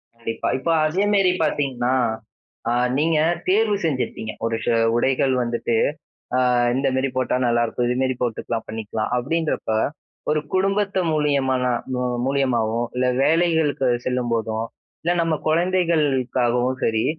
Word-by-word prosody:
கண்டிப்பா. 115 -1 -4
இப்ப 165 - -3 0.2
அதே 180 +6 +1
மாதிரி 195 -3 +4
பாத்தீங்கன்னா, 130 -5 0 0.8
அ - - +1 0.3
நீங்க 160 +1 +2 0.3
தேர்வு 210 +2 +3
செஞ்சுருப்பீங்க. 130 -6 -2
ஒரு 115 - 0
செ - - +2 0.2
உடைகள் 130 +2 +2
வந்துட்டு, 120 0 -1 1.0
"இந்த 135 +1 +1
மாதிரி 130 +1 +1
போட்டா 130 -1 +1
நல்லாருக்கும். 120 +1 +1
இது 125 - 0
மாதிரி 130 0 +1
போட்டுக்கலாம், 115 -1 -2
பண்ணிக்கலாம்." 110 0 -4
அப்படின்றப்ப, 150 0 -1 0.6
ஒரு 155 0 +2
குடும்பத்து 195 +1 +1
மூலியமானா 135 -4 +1 0.2
மு 125 - -1
மு 120 - -2
மூலியமாவோ, 120 -5 +1
இல்ல 125 0 +1 0.2
வேலைகளுக்கு 160 -4 +2 0.2
செல்லும்போதோ, 115 -3 -1 0.4
இல்ல 170 +2 +1
நம்ம 165 -1 +1
குழந்தைகளுக்காகவும் 135 -8 +1
சரி, 110 -1 +1
130 Hz, 120 wpm, -22 LUFS, 120-160 Hz, 1.0 s, மாதிரி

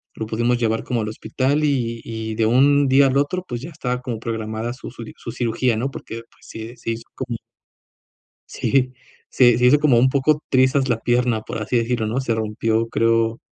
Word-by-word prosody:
lo 110 - -4
pudimos 120 +2 0
llevar 115 -1 0
como 120 -3 -1
al 105 - -3
hospital 135 +6 -1
y 120 -6 0
y 110 -1 -5
de 110 - +1
un 140 +4 +4
día 140 +1 +6
al 130 - 0
otro, 180 +6 0
pues 120 -1 -5
ya 155 - -7
estaba 125 -6 -3
como 125 -4 -4
programada 110 0 -4
su 125 - -9
su 115 -1 -9
su 115 - -8
cirugía, 120 0 0
¿no? 135 +5 -2
Porque 115 -3 -8
pues - - -21
se 115 +2 -8
se 115 - -7
hizo 115 0 -5
como 125 -3 -4 1.1
Sí, 130 -2 +1 0.4
se 120 -2 +4
se 125 - +3
hizo 140 +4 +6
como 140 -6 +4
un 130 +2 +4
poco 145 +3 +2
trizas 130 +1 +3
la 115 -2 +1
pierna, 120 -2 +1
por 110 - -5
así 115 +3 0
decirlo, 115 -1 0
¿no? 115 +4 -1
Se 130 -3 -1
rompió, 110 +1 0
creo 115 0 +1
120 Hz, 205 wpm, -21 LUFS, 115-130 Hz, 1.1 s, día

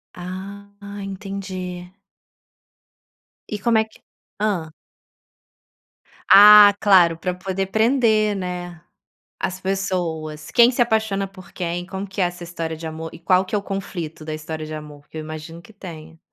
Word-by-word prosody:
Ah, 190 +3 -8 0.3
entendi. 190 -2 -6 1.6
E 210 - -3
como 235 -2 +3
é 220 - +2
que - - -20 0.4
hã. 185 -7 -1 1.6
Ah, 205 0 +10
claro, 180 -5 +5
pra 180 +2 -2
poder 190 +1 -3
prender, 220 -1 +2
né? 180 -2 -5 0.6
As 185 0 -3
pessoas. 175 -5 -3
Quem 240 +1 +6
se 245 - 0
apaixona 220 -4 +1
por 190 -1 -15
quem? 175 0 -3
Como 195 +1 -6
que 190 +1 -8
é - - +4
essa 175 0 -5
história 165 -1 -5
de 160 +1 -7
amor? 160 +1 -6
E - - -11
qual 185 +2 +3
que 185 - -13
é - - +3
o 200 - -2
conflito 175 -6 -6
da 155 - -4
história 155 0 -6
de 155 - -7
amor? 150 -1 -10
Que - - -10
eu - - -4
imagino 155 +2 -8
que 220 - -17
tenha. 165 -5 -11
185 Hz, 155 wpm, -22 LUFS, 165-200 Hz, 1.6 s, Ah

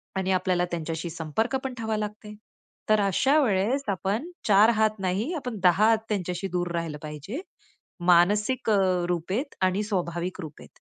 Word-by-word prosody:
आणि 190 0 0
आपल्याला 180 -1 +1
त्यांच्याशी 165 0 -3
संपर्क 165 - -2
पण 265 -1 -3
ठेवावा 220 -2 -3
लागत 210 0 -5
आहे. 210 0 -9 0.5
तर 215 - +5
अशा 260 - +3
वेळेस 220 +5 +1
आपण 200 - -2 0.2
चार 210 +1 +6
हात 215 -1 +1
नाही, 195 - -1
आपण 250 -7 -4
दहा 185 +4 +5
हात 225 - +5
त्यांच्याशी 185 -2 -2
दूर 175 -1 -1
राहिलं 165 -3 -3
पाहिजे 150 - -6 0.7
मानसिक 205 +8 +3 0.4
रूपेत 190 - -2
आणि 185 +2 +2
स्वाभाविक 180 -3 -3
रूपेत. 155 -3 -10
195 Hz, 150 wpm, -26 LUFS, 175-220 Hz, 0.7 s, चार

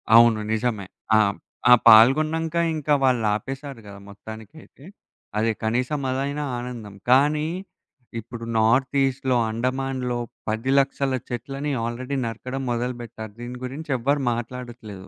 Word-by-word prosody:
అవును. 115 -1 +7
నిజమే. 110 -3 -1 0.3
ఆ! - - +6 0.5
ఆ - - +12
పాల్గొన్నంక 155 +9 +6 0.2
ఇంకా 150 -1 0
వాళ్ళు 125 -4 +3
ఆపేశారు 135 +2 -6
గదా! 100 -1 -10
మొత్తానికైితే. 110 +8 -12 0.5
అదే 115 +1 +2
కనీసం 125 +6 0
అదైనా 140 +3 -2
ఆనందం. 120 -5 -7
కానీ 150 +4 +4 0.7
ఇప్పుడు 115 +1 -8
నార్త్ 125 +5 +3
ఈస్ట్‌లో, 130 -1 0
అండమాన్‌‌లో 125 +1 -2 0.3
10 115 +5 -1
లక్షల 135 0 0 0.2
చెట్లని 135 +5 -4
ఆల్రెడీ 125 +4 -3
నరకడం 125 +4 -5
మొదలుపెట్టారు. 120 -3 -4
దీని 120 +1 -6
గురించి 145 +4 -6
ఎవ్వరు 140 +4 +1
మాట్లాడట్లేదు. 120 -5 -7
125 Hz, 115 wpm, -24 LUFS, 115-135 Hz, 0.7 s, ఆ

